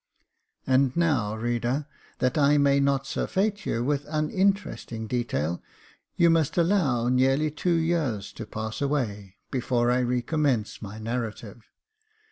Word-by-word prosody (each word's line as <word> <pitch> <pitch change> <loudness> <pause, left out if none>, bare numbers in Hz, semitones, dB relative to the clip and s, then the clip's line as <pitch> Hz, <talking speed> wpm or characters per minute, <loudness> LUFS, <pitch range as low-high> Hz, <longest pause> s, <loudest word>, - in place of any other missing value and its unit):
And 130 +1 +2
now, 130 -11 +1
reader, 120 +5 -1 0.3
that 125 0 0
I 145 0 +4
may 140 -1 +4
not 140 -1 +1
surfeit 205 +8 -1
you 115 - 0
with 145 +2 0
an - - -15
un 155 0 0
interesting 195 - -1
detail, 105 - -2 0.5
you 170 -1 +5
must 165 -2 +1
allow 165 -10 +2
nearly 135 +4 +2
two 170 +3 0
years 160 - -1
to - - -8
pass 110 +2 -5
away 105 -9 -2 0.2
before 120 -2 +1
I 125 - +2
recommence 125 -1 0
my 105 0 -7
narrative. 115 -1 -5
130 Hz, 135 wpm, -26 LUFS, 115-150 Hz, 0.5 s, you